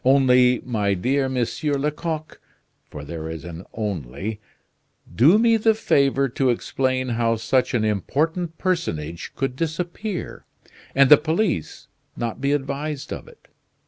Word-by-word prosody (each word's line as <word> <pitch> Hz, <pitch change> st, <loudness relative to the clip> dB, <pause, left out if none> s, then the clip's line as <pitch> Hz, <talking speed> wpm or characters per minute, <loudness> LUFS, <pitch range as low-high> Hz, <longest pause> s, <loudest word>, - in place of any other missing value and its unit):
Only, 125 Hz, -2 st, +4 dB
my 105 Hz, -5 st, 0 dB
dear 130 Hz, +8 st, 0 dB
Monsieur 130 Hz, +4 st, -1 dB
Lecoq 150 Hz, +2 st, -3 dB, 0.5 s
(for 75 Hz, -, -8 dB
there 80 Hz, 0 st, -6 dB
is 80 Hz, -1 st, -7 dB
an 85 Hz, +2 st, -8 dB
only), 100 Hz, -, -4 dB, 0.8 s
do 150 Hz, -, +6 dB
me 230 Hz, 0 st, +4 dB
the 220 Hz, 0 st, +3 dB
favor 140 Hz, -9 st, +2 dB
to 130 Hz, +1 st, 0 dB
explain 130 Hz, +1 st, 0 dB
how 115 Hz, -1 st, +1 dB
such 125 Hz, +3 st, +1 dB
an 110 Hz, -2 st, +1 dB
important 160 Hz, -, -1 dB
personage 85 Hz, -, -2 dB
could 135 Hz, -2 st, -2 dB
disappear, 175 Hz, +6 st, -4 dB, 0.5 s
and 135 Hz, 0 st, +6 dB
the 150 Hz, -, +11 dB
police 160 Hz, -, -1 dB, 0.3 s
not 120 Hz, +1 st, -3 dB
be 140 Hz, 0 st, +1 dB
advised 140 Hz, +1 st, -3 dB
of -, -, -8 dB
it? 475 Hz, -1 st, -18 dB
135 Hz, 135 wpm, -23 LUFS, 110-155 Hz, 0.8 s, the